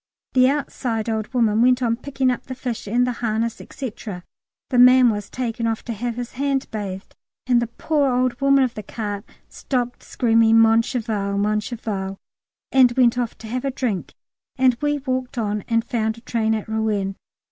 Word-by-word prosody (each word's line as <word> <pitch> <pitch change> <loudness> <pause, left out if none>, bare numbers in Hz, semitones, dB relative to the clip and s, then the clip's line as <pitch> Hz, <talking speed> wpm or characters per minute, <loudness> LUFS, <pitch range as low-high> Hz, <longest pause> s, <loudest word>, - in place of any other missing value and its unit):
The 255 0 +5
outside 250 -6 -2
old 220 +1 -2
woman 225 -3 +2
went 250 +1 +4
on 230 -1 +2
picking 260 +1 0
up 250 - -5
the 260 - -5
fish 245 -4 -5
and 240 +4 +2
the 250 - 0
harness, 225 0 -1
&c., 260 -5 -5
the 210 +5 -6
man 250 -1 +7
was 205 -1 -5
taken 235 -2 -2
off 225 -1 -2
to 235 - -3
have 235 +2 -3
his 245 0 -5
hand 275 0 -1
bathed, 195 -3 -6 0.3
and 245 -1 +3
the 235 - -1
poor 285 +3 0
old 250 0 0
woman 275 0 +5
of 250 -2 -1
the 215 - -6
cart 205 -1 -5 0.2
stopped 245 -2 -3
screaming 225 -1 +3
"Mon 225 0 +6
cheval, 215 -5 -2
mon 210 +1 +1
cheval," 205 -4 -4 0.5
and 260 -2 +6
went 245 -1 +3
off 240 -2 -3
to 220 - -10
have 250 +3 -3
a 275 - 0
drink, 245 -8 -3 0.4
and 255 -2 +3
we 295 0 +1
walked 255 -2 -3
on 210 -2 -1
and 230 -1 +1
found 220 -2 -1
a - - -13
train 220 -2 0
at 215 - -4
Rouen. 215 -3 -1
235 Hz, 190 wpm, -22 LUFS, 220-255 Hz, 0.5 s, man